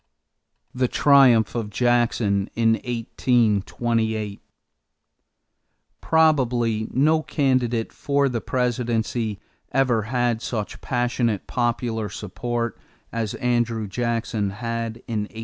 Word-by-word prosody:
=The 125 Hz, 0 st, +1 dB
Triumph 130 Hz, -6 st, +5 dB
of 115 Hz, -3 st, -3 dB
Jackson 115 Hz, -3 st, +1 dB
in 115 Hz, -1 st, +3 dB
1828.= 115 Hz, -2 st, 0 dB, 1.6 s
Probably 125 Hz, -9 st, +2 dB
no 155 Hz, +4 st, +3 dB
candidate 130 Hz, -7 st, 0 dB
for 140 Hz, -1 st, +1 dB
the 120 Hz, -4 st, -2 dB
presidency 120 Hz, -3 st, -1 dB, 0.3 s
ever 125 Hz, -4 st, +2 dB
had 120 Hz, 0 st, 0 dB
such 110 Hz, -5 st, -4 dB
passionate 120 Hz, -4 st, -1 dB
popular 120 Hz, -3 st, -1 dB
support 115 Hz, +4 st, -4 dB, 0.3 s
as 115 Hz, -3 st, -2 dB
Andrew 120 Hz, -3 st, 0 dB
Jackson 115 Hz, -1 st, -1 dB
had 115 Hz, +2 st, -4 dB
in 110 Hz, -3 st, -2 dB
1828. 110 Hz, -, -10 dB
115 Hz, 95 wpm, -23 LUFS, 110-125 Hz, 1.6 s, Triumph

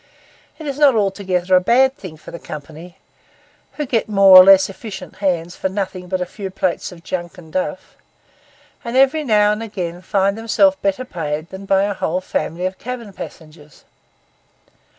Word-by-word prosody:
It 315 Hz, -, -9 dB
is 285 Hz, -1 st, -4 dB
not 285 Hz, -4 st, +5 dB
altogether 190 Hz, -3 st, 0 dB
a 180 Hz, -, +5 dB
bad 260 Hz, +7 st, +3 dB
thing 175 Hz, -, -10 dB
for -, -, -12 dB
the 170 Hz, -, -8 dB
company, 160 Hz, +4 st, -10 dB, 0.8 s
who 300 Hz, -, -4 dB
get 230 Hz, -4 st, -1 dB
more 195 Hz, -2 st, +6 dB
or 185 Hz, -, +12 dB
less 195 Hz, 0 st, +6 dB
efficient 195 Hz, -1 st, -9 dB
hands 175 Hz, -3 st, -1 dB
for 190 Hz, -, -2 dB
nothing 185 Hz, -2 st, -4 dB
but 185 Hz, +1 st, -2 dB
a 180 Hz, -, -2 dB
few 195 Hz, +2 st, -7 dB
plates 185 Hz, -1 st, -2 dB
of 170 Hz, -2 st, -14 dB
junk 175 Hz, -2 st, -5 dB
and 160 Hz, -3 st, -14 dB
duff; 185 Hz, -, -4 dB, 0.9 s
and 235 Hz, +2 st, -3 dB
every 275 Hz, +4 st, +3 dB
now 210 Hz, -5 st, +3 dB
and 210 Hz, +1 st, -2 dB
again 180 Hz, -6 st, -5 dB
find 195 Hz, 0 st, 0 dB
themselves 255 Hz, +6 st, +2 dB
better 200 Hz, +6 st, -1 dB
paid 155 Hz, -6 st, -4 dB
than 190 Hz, +1 st, -9 dB
by 195 Hz, 0 st, +3 dB
a 205 Hz, 0 st, -1 dB
whole 180 Hz, -1 st, -2 dB
family 180 Hz, -1 st, -3 dB
of 185 Hz, 0 st, -4 dB
cabin 235 Hz, -4 st, -7 dB
passengers. 155 Hz, -4 st, -12 dB
190 Hz, 175 wpm, -19 LUFS, 180-215 Hz, 0.9 s, or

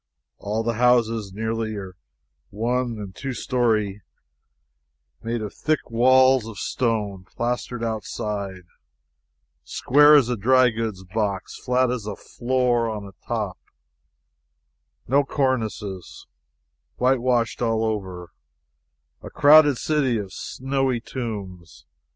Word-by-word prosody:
All 105 Hz, +2 st, -2 dB
the 115 Hz, 0 st, -2 dB
houses 115 Hz, -4 st, +2 dB
nearly 110 Hz, +1 st, -3 dB
are 95 Hz, -2 st, -7 dB, 0.5 s
one 120 Hz, +2 st, -1 dB
and 100 Hz, -3 st, -7 dB
two 135 Hz, +4 st, -5 dB
story, 110 Hz, -5 st, 0 dB, 1.2 s
made 115 Hz, -1 st, -3 dB
of 105 Hz, -, -6 dB
thick 155 Hz, -5 st, -2 dB
walls 130 Hz, 0 st, +4 dB
of 110 Hz, -3 st, -9 dB
stone, 105 Hz, -6 st, -2 dB
plastered 120 Hz, +2 st, -3 dB
outside, 105 Hz, -4 st, -4 dB, 1.0 s
square 145 Hz, -, +5 dB
as 140 Hz, -5 st, +5 dB
a 125 Hz, -, 0 dB
dry 125 Hz, +3 st, +4 dB
goods 110 Hz, -4 st, -4 dB
box, 100 Hz, 0 st, -3 dB
flat 125 Hz, 0 st, +1 dB
as 115 Hz, -4 st, -4 dB
a 105 Hz, -, -4 dB
floor 120 Hz, -1 st, 0 dB
on 105 Hz, -2 st, -6 dB, 0.2 s
top, 105 Hz, -6 st, -3 dB, 1.5 s
no 140 Hz, +4 st, +3 dB
cornices, 110 Hz, -, -3 dB, 0.7 s
whitewashed 125 Hz, -2 st, +1 dB
all 115 Hz, -1 st, +1 dB
over 95 Hz, -5 st, -4 dB, 0.9 s
a -, -, -9 dB
crowded 145 Hz, -2 st, +6 dB
city 140 Hz, -6 st, +1 dB
of 100 Hz, -3 st, -6 dB
snowy 135 Hz, -1 st, -2 dB
tombs! 100 Hz, -9 st, -7 dB
115 Hz, 110 wpm, -23 LUFS, 105-125 Hz, 1.5 s, crowded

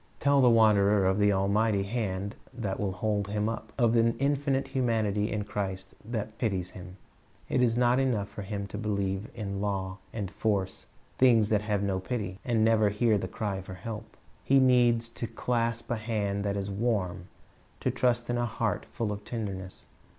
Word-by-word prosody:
Tell 140 Hz, -1 st, +4 dB
the 125 Hz, -, +6 dB
wanderer 105 Hz, -3 st, +5 dB
of 95 Hz, +2 st, +2 dB
an 105 Hz, 0 st, +5 dB
almighty 100 Hz, +1 st, +2 dB
hand 100 Hz, -2 st, -2 dB, 0.2 s
that 105 Hz, -6 st, -3 dB
will 100 Hz, -2 st, 0 dB
hold 105 Hz, 0 st, -1 dB
him 105 Hz, +1 st, -1 dB
up, 110 Hz, -1 st, -4 dB
of 120 Hz, -2 st, +3 dB
an 115 Hz, 0 st, +3 dB
infinite 140 Hz, -1 st, 0 dB
humanity 110 Hz, -5 st, 0 dB
in 105 Hz, -2 st, -1 dB
Christ 95 Hz, -2 st, -4 dB
that 110 Hz, -1 st, -4 dB
pities 95 Hz, -6 st, -1 dB
him. 90 Hz, 0 st, -10 dB, 0.5 s
It -, -, +2 dB
is 120 Hz, -2 st, +2 dB
not 125 Hz, +1 st, +4 dB
enough 120 Hz, -7 st, +1 dB
for 105 Hz, -, -8 dB
him 100 Hz, 0 st, -4 dB
to 105 Hz, -, -5 dB
believe 100 Hz, -1 st, -2 dB
in 100 Hz, -3 st, -4 dB
law 95 Hz, -2 st, -2 dB
and 105 Hz, -4 st, -4 dB
force, 100 Hz, -4 st, -1 dB, 0.3 s
things 115 Hz, -5 st, +5 dB
that 105 Hz, -2 st, +2 dB
have 105 Hz, -1 st, -1 dB
no 95 Hz, -2 st, 0 dB
pity, 100 Hz, -2 st, -4 dB
and 115 Hz, -3 st, +2 dB
never 110 Hz, -2 st, +4 dB
hear 105 Hz, +1 st, +2 dB
the 95 Hz, -, -3 dB
cry 95 Hz, 0 st, -3 dB
for 95 Hz, 0 st, -9 dB
help. 110 Hz, +4 st, -7 dB, 0.3 s
He 135 Hz, -, +4 dB
needs 120 Hz, -3 st, +4 dB
to 115 Hz, 0 st, -5 dB
clasp 115 Hz, 0 st, -1 dB
a 120 Hz, -, +1 dB
hand 105 Hz, -3 st, -1 dB
that 100 Hz, 0 st, 0 dB
is 100 Hz, 0 st, -3 dB
warm, 100 Hz, -5 st, -1 dB, 0.5 s
to -, -, +1 dB
trust 120 Hz, -1 st, +1 dB
in 120 Hz, 0 st, 0 dB
a 120 Hz, -, +1 dB
heart 110 Hz, -2 st, -2 dB
full 110 Hz, -3 st, -2 dB
of 105 Hz, 0 st, -5 dB
tenderness. 100 Hz, -5 st, -5 dB
105 Hz, 185 wpm, -29 LUFS, 100-115 Hz, 0.5 s, the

